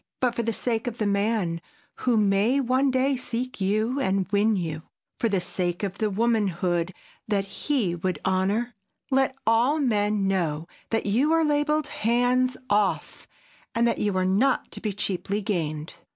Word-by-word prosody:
But 250 -2 +1
for 235 - -1
the 230 0 -1
sake 230 +1 -2
of 235 -1 -3
the 215 - -1
man 200 -4 0 0.4
who 245 -3 +1
may 210 +5 +3
one 260 +1 +2
day 260 +1 +2
seek 250 -2 -4
you 215 +7 +1
and 195 -7 0
win 210 +2 +3
you—for 165 +6 -4
the 200 -3 +1
sake 180 0 -2
of 200 0 -3
the 215 -2 +1
womanhood 190 -5 0 0.4
that 200 -2 0
he 210 -1 -1
would 180 0 -2
honor—let 215 +7 -1
all 235 +7 +3
men 210 -6 +1
know 165 -5 -1 0.2
that 225 - 0
you 245 +10 +2
are 325 -1 +3
labeled—"HANDS 255 -4 +1
OFF!" 205 -1 0 0.5
and 235 +1 +3
that 235 - 0
you 205 -3 0
are 185 - +1
not 220 +8 +2
to - - -7
be 215 - -1
cheaply 200 0 -2
gained. 160 -7 -3
215 Hz, 155 wpm, -25 LUFS, 190-245 Hz, 0.5 s, may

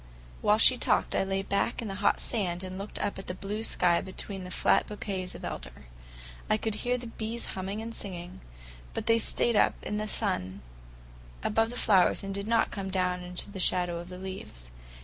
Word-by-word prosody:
While - - +4
she - - +7
talked, - - +2
I - - +3
lay 195 0 -1
back 200 +4 0
in 230 - -3
the 195 - -3
hot - - +3
sand 185 -6 0
and 185 0 -6
looked 200 +2 -5
up 200 -1 -2
at 195 - -9
the 180 - -3
blue 200 +3 -4
sky 175 -5 +3
between 190 0 -4
the 180 - -7
flat - - +3
bouquets 195 -3 -4
of - - -7
elder. 60 +3 -7 0.6
I 215 - +4
could 220 0 -2
hear 250 0 +1
the 245 - -7
bees 230 0 -3
humming 195 +3 -4
and 230 0 -6
singing, 180 -4 -7 0.5
but - - -2
they 230 0 +4
stayed 235 +1 +2
up - - +4
in 210 - -2
the 215 0 -2
sun 100 - -1 0.8
above 225 +1 +2
the 245 - -7
flowers 195 -7 +4
and 195 0 -4
did 200 +1 -4
not 230 0 +3
come 195 -2 -4
down 180 -1 0
into 180 +3 -5
the 195 - -7
shadow 180 -1 +2
of 175 +1 -8
the 180 - -8
leaves. 185 - -8
195 Hz, 210 wpm, -29 LUFS, 180-215 Hz, 0.8 s, she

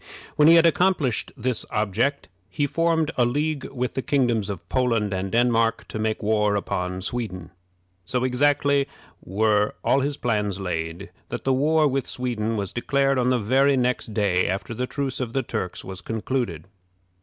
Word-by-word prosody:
When 150 - +5
he 165 - +8
had 165 0 +6
accomplished 165 - +2
this 125 -1 -1
object, 110 +7 0 0.2
he 145 +5 -1
formed 165 +1 +1
a - - +6
league 145 +4 -1
with 125 -2 -3
the 130 - -2
kingdoms 120 -7 +1
of 90 -4 -6
Poland 115 -5 +1
and 95 0 -3
Denmark 115 -1 +2
to 110 - -5
make 110 0 -1
war 105 -1 +2
upon 90 -2 -2
Sweden. 100 -6 -4 0.5
So 125 +8 -2
exactly 140 +2 +2 0.4
were 105 +2 +1
all 135 - +3
his 140 +1 -1
plans 105 -5 -1
laid, 80 -3 -4 0.2
that - - -5
the 135 - +2
war 155 +3 +3
with 135 -2 -1
Sweden 115 -3 -2
was 100 -1 -4
declared 135 +2 +1
on 125 0 +2
the 130 - +3
very 135 +5 +3
next 125 -2 0
day 100 -4 +1
after 95 +5 -3
the 125 +2 -3
truce 140 -2 -3
of 120 -3 -3
the 135 - 0
Turks 90 -5 -4
was 95 -1 -7
concluded. 115 -7 -3
120 Hz, 170 wpm, -24 LUFS, 105-135 Hz, 0.5 s, he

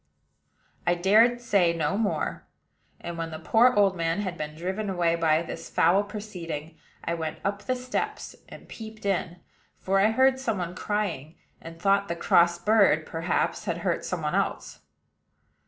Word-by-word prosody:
I 175 - +4
dared 220 +7 +4
say 190 -7 +2
no 160 +1 -1
more; 210 -1 -2 0.5
and, 170 -1 -6
when 165 0 -3
the 160 - -6
poor 225 +9 +4
old 200 -2 +4
man 165 +2 -1
had 185 -4 -3
been 150 -2 -6
driven 190 +5 -3
away 175 -3 +1
by 165 -1 +2
this - - -8
foul 175 +5 +3
proceeding, 175 -7 -7 0.3
I 170 - -1
went 160 -2 -4
up 200 +1 -1
the 255 +5 -1
steps 250 0 -4
and - - -12
peeped 220 -1 -10
in; 180 -3 -1 0.4
for 195 +1 +1
I 205 +2 +4
heard 260 +3 +3
some 225 -6 -1
one 175 -1 -4
crying, 180 -7 -3 0.3
and 165 0 -10
thought 200 +2 +2
the 170 - -3
cross 170 0 +3
bird, 195 -5 +3
perhaps, 165 +1 -1
had - - -2
hurt - - 0
some - - -4
one - - -1
else. - - -2
185 Hz, 170 wpm, -26 LUFS, 165-210 Hz, 0.5 s, I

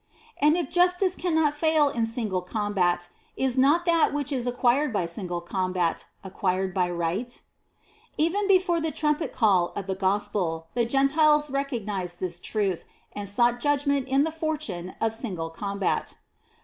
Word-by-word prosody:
And 300 +3 +4
if 340 -6 -3
Justice 360 +1 +3
cannot 320 -4 +1
fail 310 -1 +3
in 235 -5 -1
single 220 -5 -2
com 205 +3 -3
bat, 175 -2 +1 0.3
is 265 -2 0
not 290 +6 +3
that 335 -2 +3
which 290 -1 -2
is 250 -3 -1
acquired 250 +3 +2
by 200 -5 0
single 175 0 -4
combat 180 -1 -1 0.2
acquired 190 -1 -1
by 180 -1 +1
Right? 175 +8 -2
5. - - -10 0.8
Even 375 +6 +1
before 365 -3 +3
the 320 - -1
trumpet 300 +1 -1
call 190 -7 +3
of 195 - -4
the 190 - -2
Gospel, 190 -4 -1
the 235 -1 +1
Gentiles 295 +3 +3
recognized 210 - -3
this 175 -2 -3
truth, 195 -3 -2 0.3
and 205 -1 -5
sought 240 +4 +2
judgment 280 0 +1
in 270 +1 +3
the 320 - -1
fortune 305 - -4
of 225 0 0
single 185 -8 -4
combat. 200 +3 -2
240 Hz, 160 wpm, -26 LUFS, 185-295 Hz, 0.8 s, And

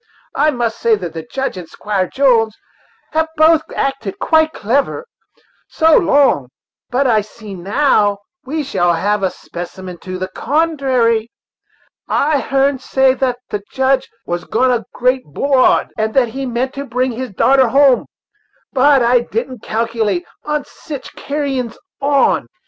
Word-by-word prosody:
I 300 +2 +3
must 235 -5 -2
say 230 -1 +3
that 175 -5 -6
the 165 - -5
Judge 265 +7 -4
and 175 -3 -8
Squire 200 -3 -2
Jones 235 -5 +2 0.5
have 320 0 +1
both 315 0 +5
acted 270 -8 -2
quite 315 -1 +3
clever, 275 - -1 0.6
so 320 -1 +3
long; 280 - +3 0.4
but 265 +3 +1
I 225 -4 +3
see 210 0 -11
that 180 - -9
now 205 -1 +2 0.3
we 300 +4 -3
shall 175 -10 +1
have 205 +4 0
a 190 - +1
specimen 175 +1 -8
to 185 0 -6
the 185 0 -3
contrary. 260 - +1 0.8
I 295 0 +1
heern 275 0 +1
say 265 0 +2
thats 250 -2 -1
the 205 - -2
Judge 265 0 +1 0.2
was 175 0 -3
gone 255 +3 +2
a 240 -2 -1
great 255 +1 +1
'broad, 260 - +2
and 220 0 -1
that 255 -3 +3
he 265 +3 -4
meant 250 +2 -2
to 280 0 -5
bring 250 +2 0
his 250 +2 -5
darter 260 +6 +3
hum, 270 +1 +4 0.7
but 275 -1 +4
I 245 +1 +4
didn't 240 +1 -4
calculate 220 -4 -1 0.2
on 300 -1 -2
sich 290 -4 -9
carrins 275 -5 -3 0.2
on. 280 -1 +2
250 Hz, 150 wpm, -17 LUFS, 215-275 Hz, 0.8 s, both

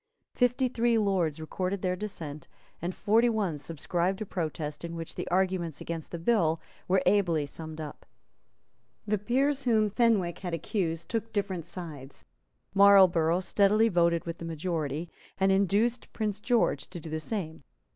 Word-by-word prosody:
Fifty 245 +1 +2
three 235 -1 +2
Lords 185 -8 +1
recorded 185 +4 -3
their 180 -1 +1
dissent; 165 -7 -6 0.3
and 175 +2 -3
forty 230 +3 +3
one 200 -9 -1
subscribed 175 +5 -2
a 215 - -3
protest, 155 -5 -4
in 170 0 -5
which 165 -1 -6
the - - -5
arguments 180 -4 0
against 165 -2 -5
the 170 - -5
bill 165 -4 +2 0.3
were 185 0 +3
ably 180 -6 +3
summed 160 +2 -8
up. 155 -2 -8 1.0
The 210 -1 0
peers 270 +6 +1
whom 220 -5 +2
Fenwick 210 -7 +2
had 175 -3 -3
accused 165 -1 -2
took 225 -1 -3
different 190 -6 -2
sides. 155 -7 -9 0.5
Marlborough 185 -4 +6
steadily 210 +4 +3
voted 170 -3 +2
with 165 -1 -5
the - - -7
majority, 160 -1 -3 0.3
and 195 0 +3
induced 200 +5 +1
Prince 210 -3 -2
George 220 - +1
to 180 - -7
do 160 - -10
the 160 - -2
same. 160 -2 -4
185 Hz, 155 wpm, -29 LUFS, 165-210 Hz, 1.0 s, Marlborough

